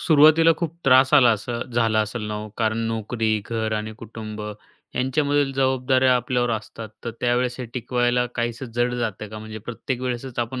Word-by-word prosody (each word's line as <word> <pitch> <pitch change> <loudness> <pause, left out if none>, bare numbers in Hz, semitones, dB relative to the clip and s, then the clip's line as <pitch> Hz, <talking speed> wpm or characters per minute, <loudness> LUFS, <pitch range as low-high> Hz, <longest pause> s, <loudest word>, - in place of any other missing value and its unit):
सुरुवातीला 160 +1 +6
खूप 165 -2 -3
त्रास 130 +1 +5
आला 125 -5 +7
असं 120 +2 -3
झाला 115 -2 +2
असलं 110 0 -3
ना 105 - -3
हो? 105 +1 -5
कारण 110 0 +1
नोकरी, 110 -1 -1
घर 110 -1 -2
आणि 110 +1 -4
कुटुंब 110 -1 -8 0.5
यांच्यामधील 140 +2 +1
जबाबदाऱ्या 130 -1 +3
आपल्यावर 125 0 0
असतात. 110 0 -5 0.2
तर 120 - -2
त्यावेळेस 125 0 +1
हे - - -3
टिकवायला 125 0 +1
काहीसं 120 +2 -2
जड 120 0 +1
जातंय 110 -3 -3
का, 110 - -8
म्हणजे 110 0 -8
प्रत्येक 120 +3 -5
वेळेसच 125 0 -4
आपण 120 +2 -2
120 Hz, 170 wpm, -23 LUFS, 110-130 Hz, 0.5 s, आला